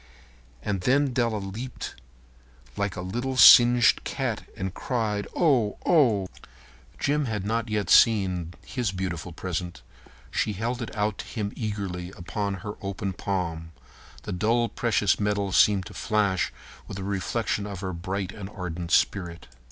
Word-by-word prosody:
And 100 -3 -2
then 135 +5 +2
Della 115 -3 +1
leaped 105 +6 -6 0.8
up - - -26
like 100 -1 -2
a 90 - -4
little 120 +8 -3
singed 120 -4 +8
cat - - -3
and 95 -1 -3
cried, 110 -5 -2
"Oh, 130 -11 +2
oh!" 115 - +4 0.7
Jim 145 +1 +1
had 105 -5 -3
not 115 +2 -1
yet 105 -3 -1
seen 90 -6 +4
his 120 -7 -2
beautiful 90 -2 -4
present. 90 +1 -5 0.5
She 105 - 0
held 120 +5 -3
it 115 - -6
out 105 -1 0
to - - -5
him 105 -3 -4
eagerly 100 -5 -4
upon 100 +2 -3
her 105 - -3
open 95 0 -3
palm. 85 -4 -3 0.5
The - - -5
dull 115 +6 +1
precious 110 -4 +1
metal 100 -1 0
seemed 100 0 +4
to - - -10
flash 105 -4 0 0.4
with 100 - -7
a 95 - -5
reflection 100 +2 -2
of 100 -3 -6
her 95 -2 -3
bright 95 +3 -3
and 100 -2 -8
ardent 90 -4 -5
spirit. 85 -2 +1
100 Hz, 150 wpm, -26 LUFS, 95-115 Hz, 0.8 s, singed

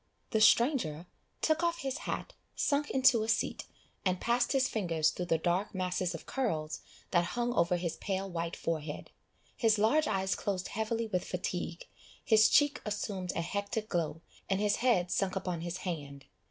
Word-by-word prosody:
The 220 - +2
stranger 215 - +4 0.4
took 315 +1 +3
off 340 0 0
his 270 +2 -3
hat, - - -3 0.2
sunk 290 0 +1
into 260 -3 +5
a 220 - -2
seat, 225 - 0 0.4
and 185 -1 +1
passed 240 +1 +1
his 265 -2 +3
fingers 165 -9 +1
through 180 - -4
the 165 - +3
dark 180 +6 -1
masses 180 -1 -1
of - - -9
curls 160 -13 -2 0.3
that 175 -2 +4
hung 240 +7 -1
over 170 -5 +2
his 170 -2 -3
pale 195 0 -2
white 170 -2 -3
forehead, 155 -2 -4 0.4
his 225 -2 +3
large 255 +9 +3
eyes 190 -2 0
closed 190 -2 -2
heavily 225 +1 -1
with 185 -5 -1
fatigue, 180 -1 -4 0.4
his 215 -1 +6
cheek 290 0 +4
assumed 205 -3 -3
a - - 0
hectic 200 +5 -3
glow, 165 -1 -2 0.3
and 195 0 +1
his 210 0 +2
head 225 -8 +2
sunk 195 -1 0
upon 180 -3 -2
his 175 +1 -4
hand. 140 -5 -5
195 Hz, 170 wpm, -31 LUFS, 175-230 Hz, 0.4 s, his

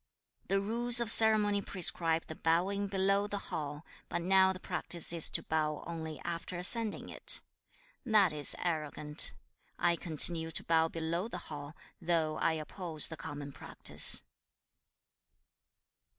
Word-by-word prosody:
2. 195 - +1
'The 195 - +1
rules 235 +3 +1
of 235 -2 +1
ceremony 215 -2 +4
prescribe 165 -4 +2
the - - -9
bowing 185 +6 -1
below 195 +1 0
the 205 - -5
hall, 150 -5 -6 0.2
but 170 - -4
now 190 +1 +3
the 185 - -8
practice 175 -3 -1
is 165 -2 +4
to - - 0
bow 155 -1 -3
only 160 -2 -7
after 170 +1 -6
ascending 215 +4 +2
it. - - +3 0.6
That 210 -8 +2
is 145 -1 +4
arrogant. 150 -3 0 0.4
I 170 0 +1
continue 165 0 +2
to 165 - -4
bow 165 -1 +1
below 165 +4 -4
the 205 - -7
hall, 150 -3 -9 0.3
though 165 -2 -1
I 165 - 0
oppose 160 0 -1
the 160 - -8
common 145 -2 -8
practice.' - - +2
170 Hz, 140 wpm, -31 LUFS, 160-195 Hz, 0.6 s, ceremony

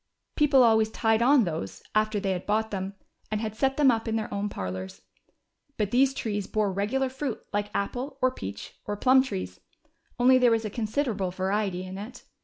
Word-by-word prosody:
People 280 -4 +5
always 220 -2 +4
tied 225 0 +1
on 265 +1 +5
those, 155 - -4
after 215 0 +1
they 195 -1 -1
had 185 -1 -4
bought 220 +1 0
them, 195 0 -4 0.3
and 215 - -1
had 215 -1 -4
set 270 +3 +1
them 285 -3 +6
up 225 0 -2
in 225 - 0
their 220 -1 -3
own 200 +1 -2
parlors. 95 - -6 0.7
But 210 -2 -1
these 270 +2 +3
trees 205 -6 -3
bore 210 -3 0
regular 225 +8 0
fruit 265 -2 -5
like 205 0 -1
apple, 255 +7 -3
or 255 -1 +3
peach, 100 - -8
or 205 0 -3
plum 260 +4 +5
trees, 90 - -5 0.6
only 255 +1 +5
there 250 -1 +5
was 225 -1 +1
a 210 - -4
considerable 215 -3 -1
variety 190 0 -1
in 185 +1 -7
it. 215 +5 -9
215 Hz, 195 wpm, -27 LUFS, 195-250 Hz, 0.7 s, them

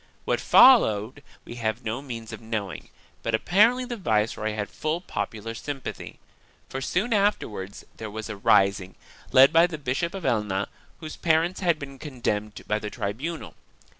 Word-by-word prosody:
What - - +1
followed 130 - +5 0.2
we 120 - -9
have 110 +1 -2
no 110 +4 -2
means 115 -5 -7
of 110 - -8
knowing, 105 -6 -5 0.3
but 115 - 0
apparently 220 - +3
the 240 -1 -5
viceroy 110 - 0
had 105 -1 -3
full 155 +2 -2
popular 115 - -5
sympathy, 135 +2 -6 0.5
for 135 - -5
soon 205 - 0
afterwards 115 - -1
there 110 - -6
was 110 +1 -6
a 105 - -5
rising, 100 -1 +2 0.4
led 135 +1 +7
by 165 +2 +6
the 165 -3 -6
Bishop 145 +6 -2
of 190 - -6
Elna, 105 -4 0 0.3
whose 155 -1 -7
parents 170 +2 +1
had 170 -4 +2
been 140 -2 -9
con 140 -4 -9
demned 105 -2 -2
by 105 0 0
the 105 - -5
tribunal. 135 +13 -5
120 Hz, 165 wpm, -25 LUFS, 105-165 Hz, 0.5 s, led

